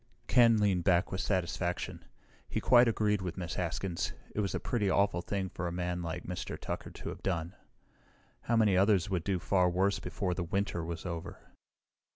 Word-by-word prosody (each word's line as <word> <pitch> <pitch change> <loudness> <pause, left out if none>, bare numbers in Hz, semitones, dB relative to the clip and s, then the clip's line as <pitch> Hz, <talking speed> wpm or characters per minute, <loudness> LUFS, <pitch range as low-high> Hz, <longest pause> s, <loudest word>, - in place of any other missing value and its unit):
Ken 115 -2 +5
leaned 100 -4 +2
back 90 0 +3
with 95 - -2
satisfaction. 90 -2 -2 0.5
He - - -1
quite 120 -1 +6
agreed 105 -3 +1
with 90 -1 -4
Miss 85 -3 -4
Haskins. 90 +1 -2 0.2
It - - -3
was 100 -3 0
a - - -1
pretty 105 -5 0
awful 100 -2 +2
thing 95 +1 -2
for 90 0 -4
a - - -3
man 90 0 -2
like 85 +1 -4
Mr. 90 0 -5
Tucker - - -5
to - - -7
have - - -8
done. 85 -2 -2 0.9
How 115 - +2
many 110 -4 +4
others 100 0 +3
would 90 -4 0
do 95 0 0
far 90 +1 +2
worse 95 +3 +1
before 95 -3 -2
the 90 - -2
winter 95 0 -1
was 80 0 -5
over? 85 0 -5
95 Hz, 190 wpm, -31 LUFS, 85-100 Hz, 0.9 s, quite